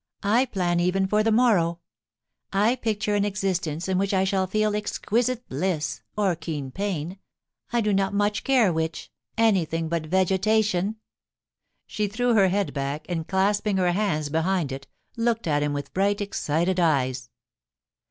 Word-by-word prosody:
I 225 +6 +3
plan 175 -7 0
even 180 +2 +1
for 210 +2 +2
the 225 +1 +2
morrow. 200 -8 +3 0.7
I 210 +5 +3
picture 215 -3 -1
an 205 -1 +2
existence 185 -5 -2
in 190 -1 +1
which 195 0 0
I 190 - +3
shall 190 -1 0
feel 215 +2 +1
exquisite 235 +4 -1
bliss, 155 +2 -2 0.2
or 195 -4 +2
keen 155 -5 -5
pain 185 0 -3 0.3
— - - -41
I 240 -1 +2
do 210 -1 +1
not 195 0 +1
much 205 +1 0
care 245 -9 +3
which 160 0 -3
— - - -62
anything 170 -8 +1
but 165 -2 -2
vegetation.' 190 +2 +1 0.9
She 210 -1 -2
threw 240 +4 0
her 200 -4 +5
head 200 +1 0
back, 140 +2 -3
and 165 -2 -3
clasping 200 +1 +1
her 180 -1 +2
hands 175 -6 0
behind 160 -1 0
it, 135 0 -7 0.3
looked 230 0 0
at 145 -3 +1
him 145 0 0
with 145 -1 -5
bright, 200 +2 +1
excited 185 -2 -1
eyes. 130 -7 +1
190 Hz, 160 wpm, -25 LUFS, 165-210 Hz, 0.9 s, her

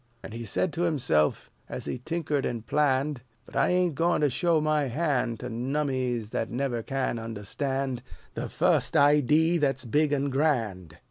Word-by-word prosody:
And - - -8
he 115 0 -6
said 155 - -1
to 165 - -2
himself, 125 - +1 0.2
as - - -5
he 130 - -4
tinkered 150 0 -2
and 115 -2 -3
planned, 145 -2 +1 0.2
"But - - -15
I - - +3
ain't 180 -2 +2
goin' 165 +3 +1
to 145 -2 +3
show 165 +4 +2
my 155 -1 +1
hand 130 -4 -1
To 125 - -4
nummies 125 -2 -2
that 115 - -2
never 125 -1 -2
can 130 -1 -2
understand 125 +4 -3 0.3
The - - -4
fust - - +2
idee 150 +4 +4
that's 135 -3 0
big 150 +5 +2
an' 140 -1 0
grand." 110 - 0
135 Hz, 165 wpm, -27 LUFS, 120-150 Hz, 0.3 s, idee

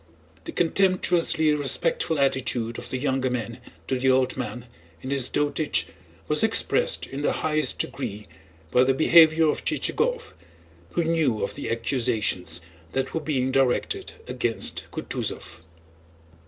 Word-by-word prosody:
The - - -5
contemptuously 175 -3 +2
respectful 150 +3 0
attitude 130 -4 0
of - - -10
the 130 - -2
younger 130 -1 0
men 120 -2 -4 0.3
to 130 - -1
the 130 +1 +2
old 130 0 +2
man 125 -1 -5 0.4
in 130 - -4
his 135 -3 +1
dotage 145 +1 0 0.4
was - - +2
expressed - - +2
in 135 +2 -6
the - - +1
highest 155 -1 +1
degree 105 +1 -4 0.4
by 125 - +5
the 135 0 +2
behavior 160 +1 +6
of 150 - -1
Chichagóv, 485 0 -1 0.6
who 170 - +1
knew 160 -9 +1
of 100 - -3
the 145 - -5
accusations 115 -8 0 0.3
that 135 0 -2
were 160 - -1
being 130 -4 -1
directed 135 -2 0
against 120 -2 -1
Kutúzov. 80 - -5
135 Hz, 135 wpm, -25 LUFS, 125-155 Hz, 0.6 s, behavior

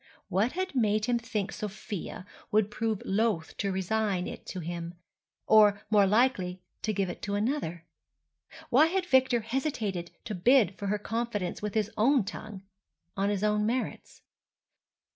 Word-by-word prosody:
What 205 +7 +1
had 375 0 -2
made 215 -4 +2
him 240 -1 +1
think 210 -3 -3
Sofia 205 -3 -6 0.2
would 210 -1 +2
prove 220 -2 -2
loath 200 -5 0
to 200 -1 -1
resign 190 0 0
it - - -8
to 185 - -5
him, 170 0 -5 0.5
or 210 -2 +6
more 205 -2 +5
likely 190 -5 +1 0.2
to 215 - 0
give 195 -2 0
it 180 - -7
to 200 -1 -2
another? 205 - -2 0.9
Why 290 +6 +6
had 370 +2 0
Victor 260 -6 +3
hesitated 220 - -2 0.2
to 220 - -4
bid 210 +2 +4
for 200 - -5
her 210 +1 +1
confidence 210 -4 -3
with 210 0 -4
his 215 0 +1
own 255 +3 +4
tongue, 200 0 -8 0.5
on 200 +1 +1
his 205 -1 -1
own 210 0 +2
merits? 250 +2 -3
210 Hz, 155 wpm, -29 LUFS, 195-235 Hz, 0.9 s, or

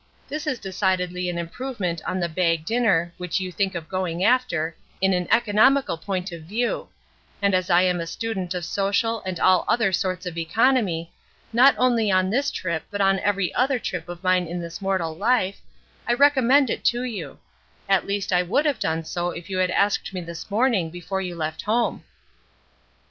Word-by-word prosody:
This 305 +2 -4
is 280 -4 0
decidedly 180 -2 -1
an 175 - -3
improvement 180 -1 -4
on 185 - -2
the 175 - 0
bag 165 -1 0
dinner 195 -7 +1
(which 180 +1 -1
you 185 -1 -4
think 195 0 -1
of 165 -2 -5
going 185 -2 -2
after) 200 -10 +1 0.2
in 190 0 +2
an 180 -1 -1
economical 230 +3 +3
point 185 +2 -4
of 170 -1 -8
view; 220 +9 -2 0.5
and 200 -1 +2
as 185 0 +1
I 175 0 +5
am 180 -1 +1
a 165 - -4
student 190 -2 -3
of 175 -1 -3
social 205 +4 0
and 185 -2 -3
all 185 -1 +4
other 225 -5 +2
sorts 185 0 -1
of 170 -2 -4
economy, 180 -2 +1 0.4
not 255 +4 +6
only 235 -4 +2
on 185 0 +2
this 280 +5 +1
trip 170 - -3
but 205 - -5
on 195 -1 +3
every 200 -3 0
other 265 +1 +2
trip 180 -7 -5
of 175 +1 -8
mine 185 -1 +2
in 175 +2 -4
this 170 +3 -7
mortal 185 -5 -1
life, 200 0 +1 0.5
I 240 - +3
recommend 275 -1 +4
it - - -3
to 240 +1 +2
you; 235 -5 -5 0.5
at 195 -1 +2
least 200 -1 -1
I 180 - +4
would 200 - +1
have 285 -7 +1
done 160 0 -1
so 175 +2 -2
if 175 +2 -8
you 185 - -1
had 185 0 +2
asked 200 0 0
me 180 - -3
this 170 +2 -8
morning 210 -5 +2
before 175 +3 -4
you 180 -2 -4
left 160 -1 -3
home." 230 +3 0
185 Hz, 190 wpm, -24 LUFS, 175-225 Hz, 0.5 s, not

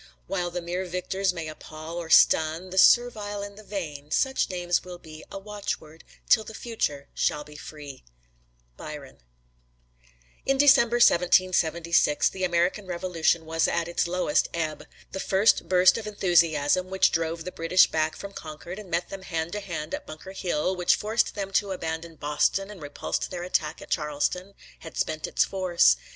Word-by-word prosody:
While 180 -2 -2
the 175 0 -5
mere 180 +2 -3
victor's 185 +2 -1
may 165 -3 -6
appal 155 +1 -8
or 165 -2 -7
stun 160 +3 +4
The 190 - +1
servile 210 -3 +4
and 200 0 -8
the 215 - -12
vain, 155 -9 -6
such 265 - +1
names 175 -2 0
will 180 -1 -9
be 155 -2 -12
A - - -6
watchword 195 -6 -6 0.2
till 220 - +5
the 220 +1 -10
future 150 - -3
shall 150 - 0
be 150 0 -14
free. 145 -2 -10 0.7
Byron. 145 - -9 1.2
In 270 0 +1
December, 270 -4 +5
1776, 170 -6 +3
the 190 - -6
American 180 +3 +1
Revolution 170 -2 0
was 165 0 +1
at 170 0 -1
its 175 0 0
lowest 180 -4 +1
ebb. 160 -2 -3 0.2
The 190 - -5
first 195 +3 +2
burst 185 +4 +5
of 215 - -7
enthusiasm, 175 -3 +2
which 190 0 +3
drove 165 0 -1
the 180 - -6
British 175 +2 +4
back 155 0 -1
from 200 0 -8
Concord 165 +4 -8
and 205 -3 -11
met 175 +1 -1
them 195 - -7
hand 165 -3 -3
to 210 - -3
hand 170 -6 -6
at - - -5
Bunker 155 +5 -9
Hill, 185 -1 -1
which 180 -1 +3
forced 215 +2 0
them 195 -2 -4
to 195 0 +1
abandon 165 -1 -5
Boston 150 +7 0
and 195 -5 -11
repulsed 145 0 -3
their 175 -1 -5
attack 180 - -1
at - - -15
Charleston, 165 +5 -2 0.2
had 160 - -10
spent 155 0 -2
its - - +2
force. 180 - +3
175 Hz, 170 wpm, -26 LUFS, 160-195 Hz, 1.2 s, till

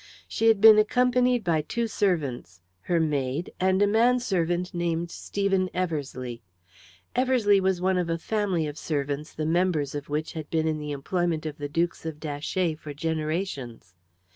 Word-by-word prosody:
She 225 - 0
had 220 -3 +5
been 215 0 +9
accompanied 250 +2 +2
by 165 -3 +1
two 235 +10 -2
servants, 145 - -1 0.2
her 170 - 0
maid, 145 0 -1
and 190 +2 +3
a - - +4
man 235 +4 +4
servant 180 -3 -1
named 170 -1 -1
Stephen 195 -2 -1
Eversleigh. 140 -9 -3 0.8
Eversleigh 245 -6 +3
was 190 -1 +1
one 185 0 +2
of 175 -2 -2
a 165 - 0
family 190 -3 -1
of 150 0 -6
servants 145 0 -3
the 155 - -4
members 165 -4 +1
of 145 0 -6
which 150 +2 -2
had 155 -2 -6
been 160 -1 0
in 155 -1 -1
the 150 0 -5
employment 160 +3 -1
of 150 -1 -5
the 145 0 -4
Dukes 170 +3 -1
of 155 -2 -6
Datchet 155 +2 -2
for 145 -2 -8
generations. 155 - -3
170 Hz, 165 wpm, -26 LUFS, 150-195 Hz, 0.8 s, been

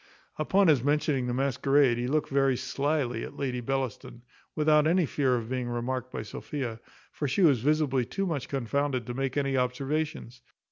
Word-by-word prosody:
Upon 190 +5 +3
his 145 -6 +4
mentioning 145 -3 +1
the 120 - -1
masquerade, 135 -1 +2
he 120 - -1
looked 150 +3 0
very 135 -2 +2
slily 130 -2 -1
at - - -8
Lady 125 -3 -2
Bellaston, 125 -1 -4 0.3
without 150 0 +4
any 175 +1 +3
fear 135 -3 +1
of 115 -2 -3
being 125 -1 -3
remarked 125 +1 -3
by - - -4
Sophia; 115 +1 -5 0.3
for 145 - -3
she 160 +9 +1
was 140 -9 +5
visibly 145 -2 +2
too 195 +11 -3
much 160 -7 -3
confounded 135 0 -1
to 120 - -5
make 135 +1 -2
any 135 -1 0
observations. 130 0 -2
135 Hz, 175 wpm, -28 LUFS, 125-145 Hz, 0.3 s, was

